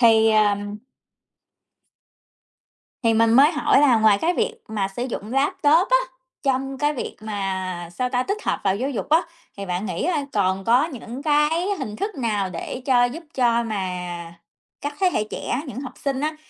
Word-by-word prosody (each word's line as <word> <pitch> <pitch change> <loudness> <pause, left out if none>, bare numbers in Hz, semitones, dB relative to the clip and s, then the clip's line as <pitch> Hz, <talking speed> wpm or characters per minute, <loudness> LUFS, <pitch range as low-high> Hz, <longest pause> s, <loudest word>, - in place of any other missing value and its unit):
Thì, 225 -2 +6
ờm 205 -1 +2 2.3
Thì 230 -2 +3
mình 225 0 +4
mới 280 +6 +7
hỏi 300 -3 +3
là 275 -5 +5
ngoài 215 -2 +5
cái 345 +2 +2
việc 455 +4 0
mà 210 -3 -1
sử 195 +6 -5
dụng 220 0 -5
laptop 290 +5 +3
á, - - +6 0.5
trong 270 0 0
cái 295 +2 +1
việc 265 - -5
mà 190 -4 -3
sao 250 +7 -1
ta, 250 0 0
tích 410 - -3
hợp - - 0
vào 195 -1 +2
giáo 255 +7 -2
dục 250 -7 -4
á, 320 +3 +5 0.4
thì 200 - -5
bạn 180 +2 -2
nghĩ 185 - -2
coi 290 -3 -1
còn 195 -2 +1
có 240 +7 +4
những 260 -3 -8
cái 305 +4 +2
hình 215 -7 -5
thức 405 - -3
nào 210 -7 -1
để 185 +8 -6
cho 250 -3 +4
giúp 270 +8 -2
cho 235 -2 +2
mà 220 -2 -3 1.0
các 290 0 -4
thế 375 - +4
hệ 210 - +1
trẻ, 250 - -3
những 260 0 -6
học 255 -3 -7
sinh 275 -2 -2
á 305 +1 -1
245 Hz, 185 wpm, -23 LUFS, 210-290 Hz, 2.3 s, mới